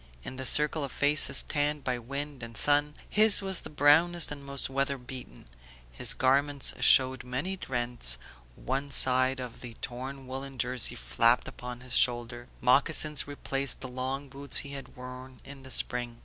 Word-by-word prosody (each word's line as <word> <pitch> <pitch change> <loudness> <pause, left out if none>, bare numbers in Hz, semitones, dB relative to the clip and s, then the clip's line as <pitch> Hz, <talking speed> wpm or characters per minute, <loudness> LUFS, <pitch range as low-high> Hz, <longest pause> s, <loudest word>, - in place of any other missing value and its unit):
In 130 - -8
the 130 -1 -2
circle 150 0 +3
of 135 - -6
faces 145 +1 +3
tanned 145 -1 -2
by 125 -2 -2
wind 140 +3 -7
and 115 0 -9
sun, 145 0 +2
his 215 0 +5
was 190 -2 +1
the - - -10
brownest 160 +4 +2
and 145 -1 -8
most 140 0 0
weather 140 +1 -2
beaten; 125 0 -11 0.5
his - - -1
garments 140 +2 +1
showed 130 -2 +4
many 145 +10 -5
rents, 120 - +3 0.4
one 135 +3 -4
side 130 0 +3
of 125 -2 -9
the 120 -2 -10
torn 130 +3 -8
woollen 135 +1 -8
jersey 125 0 0
flapped 90 - +1
upon 125 0 -9
his 125 -1 -4
shoulder, 120 0 0
moccasins 150 +3 +2
replaced 140 -1 -3
the 130 - -5
long 130 +2 -5
boots 140 +1 +1
he - - -9
had 140 -1 -10
worn 125 +1 -11
in 135 0 -11
the 130 - -9
spring. 120 -1 0
135 Hz, 165 wpm, -28 LUFS, 125-145 Hz, 0.5 s, his